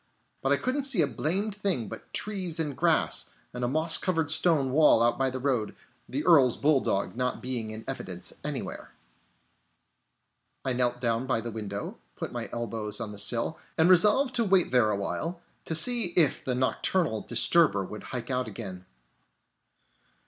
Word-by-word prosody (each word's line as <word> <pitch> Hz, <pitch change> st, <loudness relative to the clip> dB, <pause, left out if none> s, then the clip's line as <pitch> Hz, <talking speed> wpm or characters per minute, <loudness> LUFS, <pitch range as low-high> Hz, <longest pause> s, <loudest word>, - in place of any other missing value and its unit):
But 135 Hz, -, 0 dB
I 140 Hz, -, +4 dB
couldn't 260 Hz, -, -1 dB
see 240 Hz, -, +5 dB
a -, -, +3 dB
blamed 175 Hz, -, -2 dB
thing 195 Hz, -, -1 dB
but -, -, -10 dB
trees 185 Hz, -6 st, -1 dB
and 150 Hz, -4 st, -2 dB
grass, -, -, +1 dB, 0.3 s
and 125 Hz, 0 st, -5 dB
a -, -, +1 dB
moss 155 Hz, +5 st, +3 dB
covered 165 Hz, -5 st, 0 dB
stone 150 Hz, -7 st, +2 dB
wall 150 Hz, -5 st, +5 dB
out 120 Hz, +2 st, +1 dB
by 135 Hz, 0 st, +2 dB
the 130 Hz, -, -5 dB
road; 125 Hz, -5 st, -1 dB, 0.3 s
the 140 Hz, +4 st, -3 dB
Earl's 140 Hz, -8 st, +5 dB
bulldog 135 Hz, -10 st, +1 dB
not 125 Hz, 0 st, -1 dB
being 125 Hz, -4 st, -3 dB
in 110 Hz, +1 st, -8 dB
evidence -, -, -4 dB
anywhere. -, -, -6 dB, 1.7 s
I 130 Hz, -, 0 dB
knelt 125 Hz, 0 st, +1 dB
down 120 Hz, +1 st, -1 dB
by 130 Hz, -, +1 dB
the 115 Hz, +1 st, -6 dB
window, 105 Hz, -2 st, -6 dB, 0.2 s
put -, -, -6 dB
my -, -, -5 dB
elbows 110 Hz, -2 st, -4 dB
on 115 Hz, -2 st, -5 dB
the 105 Hz, -, -7 dB
sill, 115 Hz, +8 st, +1 dB, 0.2 s
and 165 Hz, +3 st, +4 dB
resolved 210 Hz, +9 st, +4 dB
to 235 Hz, -, +2 dB
wait 190 Hz, -4 st, +2 dB
there 125 Hz, -4 st, +3 dB
awhile, 105 Hz, -, -3 dB, 0.3 s
to 160 Hz, -, -2 dB
see 240 Hz, +7 st, +2 dB
if 160 Hz, -5 st, +3 dB
the 125 Hz, -, -1 dB
nocturnal 130 Hz, -, 0 dB
disturber 120 Hz, -, +3 dB
would 105 Hz, +2 st, -9 dB
hike 125 Hz, 0 st, -5 dB
out 125 Hz, -1 st, -1 dB
again. 95 Hz, -4 st, -8 dB
130 Hz, 170 wpm, -27 LUFS, 115-165 Hz, 1.7 s, see